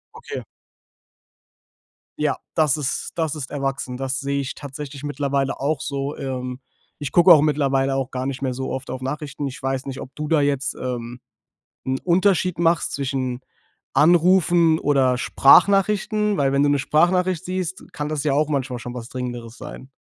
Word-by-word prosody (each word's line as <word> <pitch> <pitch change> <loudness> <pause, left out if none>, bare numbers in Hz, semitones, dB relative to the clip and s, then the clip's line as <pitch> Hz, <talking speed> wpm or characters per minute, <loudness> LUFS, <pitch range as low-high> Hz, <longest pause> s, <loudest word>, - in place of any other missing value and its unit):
Okay. 465 - -7 1.7
Ja, - - 0 0.2
das 155 -3 +2
ist 140 -3 -3
das 160 -2 -1
ist 140 -3 -6
erwachsen. 135 -2 -3
Das 135 0 -2
sehe 140 0 -1
ich 135 - -4
tatsächlich 145 0 -8
mittlerweile 140 -1 -1
auch 145 +3 -1
so. 140 +1 -3
Ähm, 125 -1 -4 0.4
ich 145 -2 -5
gucke 175 +1 +6
auch 155 - +6
mittlerweile 135 -2 +1
auch 135 -1 -2
gar 130 0 -3
nicht 135 -1 -4
mehr 130 -2 -1
so 130 +1 -4
oft 135 +1 -5
auf 130 0 -5
Nachrichten. 145 +1 -4
Ich 135 +2 -8
weiß 135 0 -2
nicht, 135 -1 -6
ob 130 - -10
du 150 0 -4
da 155 -1 +3
jetzt, 140 -1 0
ähm, 120 -1 -5 0.7
'n 130 0 0
Unterschied 185 -1 +2
machst 170 -1 +2
zwischen 130 -3 -2 0.5
Anrufen 170 +2 +4
oder 130 -3 +2
Sprachnachrichten. 200 - +4
Weil 135 -1 +2
wenn 140 0 +2
du 145 - +3
'ne 145 -1 +2
Sprachnachricht 180 +4 +2
siehst, 185 -1 -4
kann 145 -1 -4
das 155 -1 -2
ja 145 - +1
auch 150 +2 +1
manchmal 130 -4 -2
schon 125 0 -7
was 120 -1 -7
Dringenderes 120 -2 -6
sein. 130 - -10
140 Hz, 170 wpm, -22 LUFS, 130-155 Hz, 1.7 s, gucke